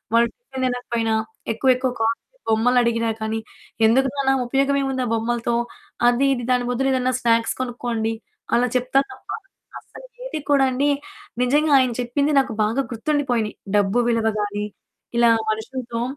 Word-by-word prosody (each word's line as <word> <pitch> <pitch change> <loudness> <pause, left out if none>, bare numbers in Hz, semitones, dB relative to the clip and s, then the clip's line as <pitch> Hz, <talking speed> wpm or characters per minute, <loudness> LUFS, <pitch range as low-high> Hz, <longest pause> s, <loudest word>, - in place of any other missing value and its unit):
వాళ్ళు 235 0 +5
టిఫిన్ 370 - -7
తినకపోయినా, 235 -3 -1 0.4
ఎక్కువ 260 +4 +1
ఎక్కువ 255 0 -1
కాస్ట్‌లీ 230 - -2
బొమ్మలడిగిన 235 0 +3 0.2
కానీ, 220 +1 -1 0.5
ఎందుకు 265 +4 +4
నాన్న? 270 -1 +2
ఉపయోగం 275 +3 +1
ఏముంది 265 -1 -1
ఆ - - -3
బొమ్మలతో 235 +1 -1 0.5
అది, 245 +3 +3
ఇది 245 -2 -3
దాని 250 -1 +2
బదులేదైనా 255 0 +1
స్నాక్స్ 230 -1 +2
కొనుక్కోండి. 240 -3 -2 0.4
అలా 245 +1 +3
చెప్తా 255 +2 +2
తప్ప - - -15 0.5
అస్సలేది - - -9
కూడా 275 -2 +5
అండి, 280 +3 +1 0.5
నిజంగా! 295 +5 +2
ఆయన 255 -2 +2
చెప్పింది 280 +5 0
నాకు 265 -4 -1
బాగా 225 +6 +1
గుర్తుండిపోయినాయి. 245 -3 -1 0.2
డబ్బు 205 +4 +2
విలువ 225 -1 +1
గానీ, 205 0 -2 0.5
ఇలా 235 -1 +5 0.2
మనుషులతో 230 +1 -4
245 Hz, 135 wpm, -22 LUFS, 230-270 Hz, 0.5 s, వాళ్ళు